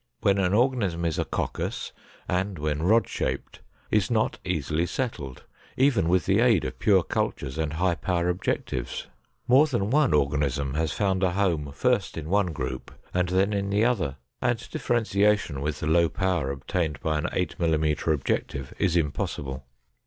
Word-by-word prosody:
When 100 Hz, -1 st, +3 dB
an 90 Hz, -2 st, +2 dB
organism 105 Hz, -9 st, +1 dB
is 80 Hz, -2 st, -1 dB
a -, -, 0 dB
coccus -, -, -3 dB, 0.4 s
and 95 Hz, +1 st, -1 dB
when 75 Hz, 0 st, -1 dB
rod 110 Hz, +7 st, +4 dB
shaped -, -, -3 dB, 0.3 s
is 105 Hz, -2 st, +2 dB
not 110 Hz, -2 st, 0 dB
easily 80 Hz, -1 st, -1 dB
settled, 80 Hz, -, -4 dB, 0.3 s
even 125 Hz, -, +3 dB
with 90 Hz, -3 st, +2 dB
the 100 Hz, +2 st, +3 dB
aid 115 Hz, -7 st, +4 dB
of 65 Hz, 0 st, -5 dB
pure 95 Hz, -4 st, +4 dB
cultures 70 Hz, -2 st, -2 dB
and 80 Hz, -1 st, -1 dB
high 90 Hz, +2 st, +1 dB
power 85 Hz, 0 st, -1 dB
objectives. 90 Hz, -8 st, -2 dB, 0.4 s
More 135 Hz, +5 st, +6 dB
than 120 Hz, -7 st, -1 dB
one 150 Hz, -1 st, +4 dB
organism 70 Hz, -1 st, 0 dB
has 80 Hz, +1 st, 0 dB
found 95 Hz, -2 st, 0 dB
a 90 Hz, -2 st, +2 dB
home 85 Hz, -7 st, 0 dB
first -, -, 0 dB
in 80 Hz, 0 st, -5 dB
one 100 Hz, 0 st, +3 dB
group 65 Hz, -5 st, -5 dB, 0.2 s
and 90 Hz, 0 st, +1 dB
then 95 Hz, +3 st, +2 dB
in 100 Hz, -1 st, -1 dB
the 105 Hz, +3 st, +2 dB
other, 100 Hz, -, 0 dB, 0.3 s
and 120 Hz, -3 st, 0 dB
differentiation 105 Hz, -, +1 dB
with 75 Hz, +1 st, -3 dB
the -, -, -2 dB
low 85 Hz, +1 st, +4 dB
power 90 Hz, -5 st, 0 dB
obtained 75 Hz, +2 st, -2 dB
by 80 Hz, -1 st, 0 dB
an -, -, -1 dB
8 90 Hz, -, -2 dB
mm 80 Hz, -2 st, +1 dB
objective 70 Hz, -2 st, -2 dB
is 90 Hz, -3 st, +2 dB
impossible. 70 Hz, -3 st, -2 dB
90 Hz, 165 wpm, -26 LUFS, 75-100 Hz, 0.4 s, More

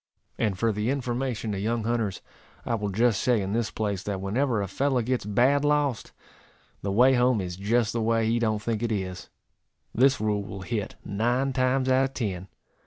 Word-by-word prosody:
And 105 Hz, -5 st, 0 dB
for 115 Hz, +4 st, +1 dB
the 105 Hz, +2 st, -1 dB
information 125 Hz, -4 st, -2 dB
of 95 Hz, -, -3 dB
young 115 Hz, +3 st, -1 dB
hunters, 110 Hz, -4 st, -1 dB, 0.4 s
I 120 Hz, -, -1 dB
will 105 Hz, -3 st, -1 dB
just 110 Hz, +1 st, +2 dB
say, 125 Hz, -3 st, +2 dB
in 95 Hz, 0 st, -3 dB
this 115 Hz, -1 st, 0 dB
place, 100 Hz, -4 st, -2 dB
that 100 Hz, -1 st, -3 dB
whenever 115 Hz, +5 st, 0 dB
a 100 Hz, -, -2 dB
fellow 130 Hz, +5 st, 0 dB
gets 125 Hz, -2 st, -1 dB
bad 130 Hz, +7 st, +3 dB
lost, 145 Hz, -4 st, +1 dB, 0.7 s
the 100 Hz, -, -2 dB
way 125 Hz, +6 st, +5 dB
home 125 Hz, -2 st, +3 dB
is 90 Hz, -2 st, -4 dB
just 110 Hz, +4 st, +1 dB
the 115 Hz, -, -1 dB
way 115 Hz, 0 st, +2 dB
he 115 Hz, +1 st, +1 dB
don't 110 Hz, -2 st, 0 dB
think 115 Hz, -1 st, -1 dB
it 120 Hz, -1 st, -1 dB
is. 95 Hz, -3 st, -4 dB, 0.6 s
This 135 Hz, +4 st, +4 dB
rule 105 Hz, -1 st, 0 dB
will 100 Hz, -1 st, -8 dB
hit 105 Hz, +1 st, -3 dB
nine 120 Hz, +6 st, 0 dB
times 130 Hz, +1 st, +1 dB
out 130 Hz, +1 st, +4 dB
of 135 Hz, -, -6 dB
ten. 95 Hz, -6 st, -3 dB
115 Hz, 195 wpm, -26 LUFS, 100-125 Hz, 0.7 s, way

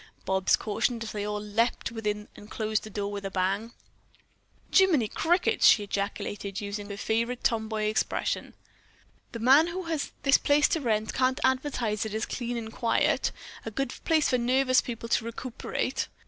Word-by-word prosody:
Bobs 190 Hz, 0 st, +3 dB
cautioned, 230 Hz, +2 st, -1 dB
as 225 Hz, -, -6 dB
they 205 Hz, -1 st, -3 dB
all 210 Hz, 0 st, -2 dB
leaped 220 Hz, +4 st, -1 dB
within 210 Hz, -2 st, -3 dB
and 205 Hz, -, -13 dB
closed 215 Hz, -1 st, -1 dB
the 215 Hz, -, -8 dB
door 205 Hz, -1 st, -3 dB
with 200 Hz, -1 st, -5 dB
a 195 Hz, -, -3 dB
bang. 195 Hz, +4 st, -1 dB, 1.0 s
"Jimminy 340 Hz, -, +4 dB
crickets!" 345 Hz, -, +2 dB
she 210 Hz, -, +6 dB
then 200 Hz, -, -10 dB
ejaculated, 200 Hz, 0 st, -3 dB
using 205 Hz, 0 st, -5 dB
her 200 Hz, -, -6 dB
favorite 230 Hz, +3 st, -1 dB
tom 220 Hz, -2 st, +1 dB
boy 215 Hz, -1 st, -2 dB
expression. 215 Hz, +1 st, -1 dB, 0.8 s
"The -, -, -5 dB
man 265 Hz, +8 st, +6 dB
who 365 Hz, +2 st, -4 dB
has 325 Hz, -4 st, -3 dB
this 275 Hz, -1 st, +5 dB
place 290 Hz, +1 st, +4 dB
to 325 Hz, -, 0 dB
rent 220 Hz, -4 st, 0 dB
can't 255 Hz, 0 st, +1 dB
advertise 255 Hz, -5 st, 0 dB
it 220 Hz, -1 st, -4 dB
as 220 Hz, -, -1 dB
clean 240 Hz, -1 st, -4 dB
and 220 Hz, -1 st, -6 dB
quiet, 230 Hz, -1 st, +1 dB, 0.3 s
a -, -, -4 dB
good 255 Hz, +3 st, -3 dB
place 315 Hz, -2 st, +3 dB
for 250 Hz, -, +2 dB
nervous 255 Hz, +2 st, +3 dB
people 230 Hz, -1 st, -6 dB
to 230 Hz, -, +1 dB
recuperate." 235 Hz, +2 st, -3 dB
225 Hz, 175 wpm, -28 LUFS, 210-255 Hz, 1.0 s, she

